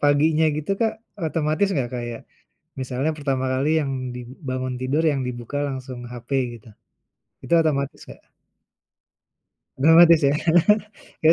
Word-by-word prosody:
paginya 150 +2 +3
gitu 155 +5 -4
Kak, 225 -1 +2 0.3
otomatis 155 +4 0
enggak 130 -8 -1
kayak 120 -1 -5 0.6
misalnya 130 +4 -1
pertama 135 -3 -1
kali 135 +3 0
yang 140 -2 -2 0.2
di 125 - -6 0.3
bangun 130 0 -2
tidur 135 +5 0
yang 140 -2 -1
dibuka 120 +2 -6
langsung 130 -2 -6
HP 120 +1 -10 0.3
gitu, 115 +1 -17 0.8
itu 170 - -2
otomatis, 140 -3 -1
Kak? - - -13 1.5
Otomatis 165 +3 +7
ya, 140 - +3
kayaknya 175 0 +2
145 Hz, 125 wpm, -23 LUFS, 130-160 Hz, 1.5 s, Otomatis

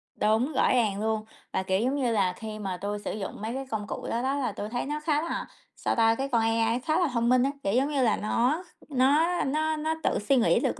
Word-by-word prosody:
Đúng, 225 +8 +1
rõ 265 - +3
ràng 210 -5 +1
luôn. 220 0 -1 0.3
Và, 190 - 0
kiểu 190 0 +1
giống 260 +4 +1
như 255 -4 +1
là, 190 -4 +2
khi 215 +1 -7
mà 190 -3 -3
tui 205 +2 -3
sử - - -4
dụng 200 -1 -6
mấy 225 +2 -3
cái 270 0 -4
công 210 -2 -3
cụ - - -5
đó 235 - -1
đó, 270 +2 0
là 255 -6 -1
tui 205 +1 -5
thấy 245 +2 -2
nó 300 +1 -3
khá 300 -1 +1
là, 335 - -3 0.3
sao - - -1
ta, 225 -1 +4
cái 270 +2 -2
con 235 -3 +2
AI 225 +1 +1
khá 310 +6 0
là 350 - +3
thông 235 0 +1
minh 255 0 +5
á, 275 - +1
kiểu 195 - 0
giống 265 +4 +2
như 285 -3 0
là, 220 - +3
nó 250 - +1 0.2
kh - - -25
nó 295 +7 +3
nó 310 +3 0
nó 315 +1 -1
tự - - +1
suy 240 +7 +2
nghĩ 240 - +4
được - - -1
240 Hz, 270 wpm, -27 LUFS, 215-280 Hz, 0.3 s, minh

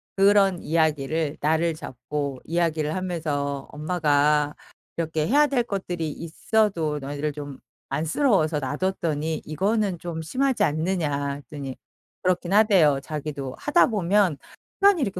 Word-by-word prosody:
그런 195 -2 +4
이야기를 155 -1 0
날을 160 +2 +1
잡고 140 0 -5
이야기를 160 -2 0
하면서 150 -7 -2
"엄마가 150 -2 +1 0.4
이렇게 160 -2 -1
해야 295 +4 +5
될 275 -4 +1
것들이 180 -7 -3
있어도 165 0 0
너희들을 145 +2 -3
좀 145 -2 -8 0.3
안쓰러워서 160 - +1
놔뒀더니 155 +1 -2
이거는 195 +4 0
좀 165 -1 -5
심하지 260 - +1
않느냐?" 155 -3 0
했더니 140 -2 -7 0.5
그렇기는 180 +1 +2
하대요. 185 -10 +5
자기도 145 -3 -5
하다 295 +4 +4
보면 200 - +2 0.4
시간이 400 -4 +5
이렇게 195 -6 -3
160 Hz, 310 characters per minute, -25 LUFS, 150-190 Hz, 0.5 s, 해야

